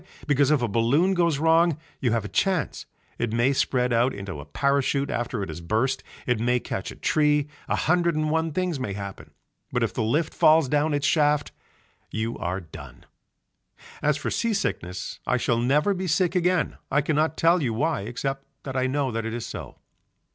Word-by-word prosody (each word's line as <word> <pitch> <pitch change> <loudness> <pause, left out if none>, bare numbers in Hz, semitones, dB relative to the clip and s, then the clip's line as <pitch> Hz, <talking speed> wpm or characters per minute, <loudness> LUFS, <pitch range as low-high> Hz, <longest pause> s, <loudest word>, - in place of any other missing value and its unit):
Because 145 -1 +3
if 150 -5 +3
a - - +2
balloon 120 - +2
goes 170 -5 +2
wrong 165 +1 +3 0.2
you 125 -4 +1
have 115 -2 0
a - - -3
chance, 185 - -1 0.3
it 120 -2 -1
may 120 +4 +2
spread 125 -2 +1
out 120 +2 +2
into 100 -6 -6
a 70 - -8
parachute 140 0 0
after 120 -3 -2
it 95 - -6
has 80 +2 -6
burst, 115 +9 0 0.2
it 125 -3 +1
may 125 +2 +2
catch - - -5
in - - -12
a - - -24
tree, 150 -1 +2 0.2
a - - +1
hundred 170 0 +2
and 155 0 0
one 160 0 0
things 180 -2 -1
may 105 -6 -3
happen, 100 -1 -7 0.4
but - - 0
if - - -1
the - - -2
lift 145 +9 0
falls 155 -2 +5
down 150 +2 +1
its 145 0 -1
shaft 150 -2 +2 0.6
you 110 +1 -3
are 90 +2 -2
done. 80 -4 -12 1.0
As 150 0 +2
for - - -3
sea 230 -2 0
sickness 90 - -3
I 125 - +2
shall 120 -1 +1
never 145 +11 +2
be 185 0 -3
sick 175 +1 +2
again, 180 -2 +1
I 145 - +3
cannot 155 +2 0
tell 170 +1 +4
you 125 -5 0
why 150 +4 0
except 135 +5 -4 0.2
that 135 -1 -6
I 130 0 +1
know 135 0 0
that 115 0 -2
it 115 - -4
is 120 - -4
so. - - -8
140 Hz, 200 wpm, -25 LUFS, 115-160 Hz, 1.0 s, falls